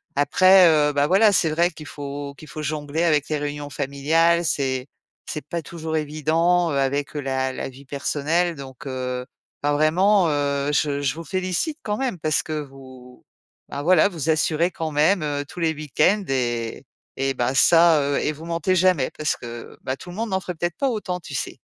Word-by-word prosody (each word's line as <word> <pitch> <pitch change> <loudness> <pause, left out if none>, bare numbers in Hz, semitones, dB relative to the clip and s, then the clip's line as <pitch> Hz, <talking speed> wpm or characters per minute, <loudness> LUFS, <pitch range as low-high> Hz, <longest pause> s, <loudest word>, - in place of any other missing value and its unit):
Après, 185 +5 +6
heu, 150 -2 +4
bah 145 0 +2
voilà, 200 +6 +5
c'est 165 -5 +2
vrai 170 +3 +2
qu'il 155 - -11
faut 145 0 -6
qu'il 155 - -13
faut 155 +1 -6
jongler 150 +2 -2
avec 150 -3 +2
les 155 - 0
réunions 145 0 -4
familiales. 150 +5 +1
C'est 130 -4 -1 0.4
c'est 150 -2 -6
pas 170 +2 -3
toujours 160 0 -5
évident, 160 +3 +1
heu, - - 0
avec, 140 +1 -1
heu, 145 - -2
la 130 -1 -1
la - - -5
vie 135 +2 -14
personnelle, 155 +5 -1
donc, 135 -1 -10
heu. 125 -1 -4 0.4
Ben 145 - +2
vraiment, 175 +6 +3
heu, 145 -1 0
je 145 -1 +1
je 135 0 0
vous 165 - -7
félicite 185 - -2
quand 210 -1 -1
même 245 -7 -2
parce 155 -1 0
que 155 -1 -3
vous, 130 -3 -12 0.4
bah 140 - -4
voilà, 180 +4 +4
vous 165 -4 -4
assurez 160 +2 +2
quand 160 -1 -4
même, 155 +4 +3
heu, 145 -1 -2
tous 175 +4 -8
les 160 -1 +2
week-ends 155 +7 +1
et 120 -2 -2 0.3
et 135 0 -1
bah 125 +1 0
ça, 165 +2 +5
heu, 140 0 0
et 150 - 0
vous 155 +2 -12
mentez 170 +2 0
jamais 180 -7 +3
parce 155 0 -1
que 120 -1 -9
bah 130 - -2
tout 175 - -12
le 175 - -8
monde 225 -2 -3
n'en 190 - +1
ferait 180 -1 -5
peut-être 175 +1 -3
pas 275 - +1
autant, 205 -6 -3
tu 155 - -10
sais? - - -4
150 Hz, 200 wpm, -23 LUFS, 140-170 Hz, 0.4 s, Après